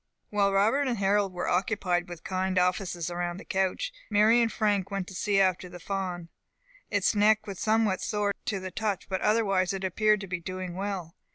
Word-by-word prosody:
While 200 -1 +2
Robert 220 +9 +3
and 240 -2 -1
Harold 200 0 +2
were 180 -1 -4
occupied 180 -2 0
with 175 -2 -9
kind 185 0 -1
offices 180 -2 0
around 175 0 -3
the 195 - -10
couch, 195 - -1 0.2
Mary 220 +3 +5
and 230 -1 +1
Frank 205 -3 0
went 195 -2 -3
to - - -10
see 195 +2 +1
after 185 -1 +1
the 175 0 -10
fawn. 180 -2 -4 0.6
Its - - +2
neck 215 +1 +3
was 195 -3 -7
somewhat 215 -3 +2
sore 205 -1 0
to 200 - -1
the 185 0 -6
touch, 210 -4 -2
but 190 -1 -2
otherwise 195 -4 +2
it 195 0 -4
appeared 210 +2 +2
to 195 - -6
be 180 -1 -3
doing 185 0 -5
well. 190 -3 -4
195 Hz, 195 wpm, -28 LUFS, 180-210 Hz, 0.6 s, Mary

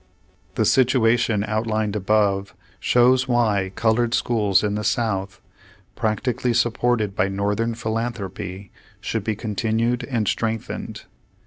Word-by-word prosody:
The - - +1
situation 120 -4 +3
outlined 110 -1 -1
above, 100 -2 +1 0.2
shows 125 +2 +3
why 105 -6 +1
colored 115 +2 +2
schools 105 -7 +2
in 105 -1 0
the 105 +1 -2
South, 105 -4 -1 0.6
practically 120 +3 -1
supported 115 -3 +1
by 95 - +2
Northern 105 +4 -1
philanthropy, 105 -5 -4 0.3
should 115 -3 -3
be 110 0 -1
continued 115 +3 -1
and 115 -6 -1
strengthened. 115 -1 -3
110 Hz, 110 wpm, -22 LUFS, 100-120 Hz, 0.6 s, situation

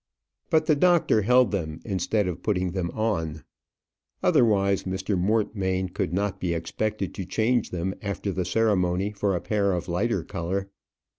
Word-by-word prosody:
But 160 -2 +3
the 155 - +4
doctor 170 -8 +4
held 125 +4 +4
them 80 -6 -3
instead 100 +1 0
of 90 -1 -4
putting 90 -4 0
them 90 -2 -2
on; 85 -8 -1 0.8
otherwise 100 -4 +3
Mr. 95 +2 -2
Mortmain 95 -1 0
could 90 - -2
not 100 +1 -1
be 85 -2 -1
expected 100 +4 -3
to 95 - -4
change 110 +6 0
them 90 +2 -2
after 100 -1 -3
the 95 -1 -1
ceremony 95 -2 +1
for 100 -2 0
a 85 - -2
pair 100 -2 +1
of 85 -1 -3
lighter 95 +1 0
colour. 95 +4 -3
100 Hz, 155 wpm, -26 LUFS, 90-110 Hz, 0.8 s, the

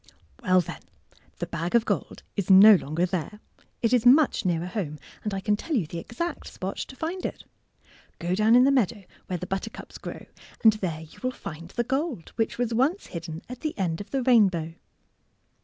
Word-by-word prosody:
Well, 185 -1 +4
then, - - -8 0.6
the - - -3
bag 170 +4 -3
of 235 - +4
gold - - -3
is 200 -3 -2
no 195 +3 +10
longer 170 -1 +1
there. 185 +3 -4 0.4
It 230 +1 +3
is 245 -3 +4
much 270 +1 +5
nearer 170 -1 0
home, 180 -6 -4 0.3
and 210 - -2
I 195 - -2
can 210 +1 +2
tell 310 +9 -3
you 205 -10 +1
the 165 +2 -6
exact 335 - -5
spot 190 +1 -5
to 265 - -6
find 335 +6 -4
it! - - -4 0.7
Go 175 +1 -2
down 215 +4 +4
in 250 - +7
the 275 - +5
meadow 225 -6 +1 0.2
where 180 - -2
the 180 - -5
buttercups 195 +4 -6
grow, - - -8 0.4
and 220 -1 +8
there 175 -7 -3
you 160 - -14
will 255 - 0
find 165 -9 -8
the 240 - -1
gold 265 - -2
which 225 -1 -1
was 240 -1 -1
once 280 - +1
hidden 165 -1 -7
at 250 0 -8
the 310 -1 -4
end 175 -3 -1
of 205 - -10
the 270 -2 -1
rainbow. 190 -10 +3
205 Hz, 200 wpm, -26 LUFS, 175-245 Hz, 0.7 s, no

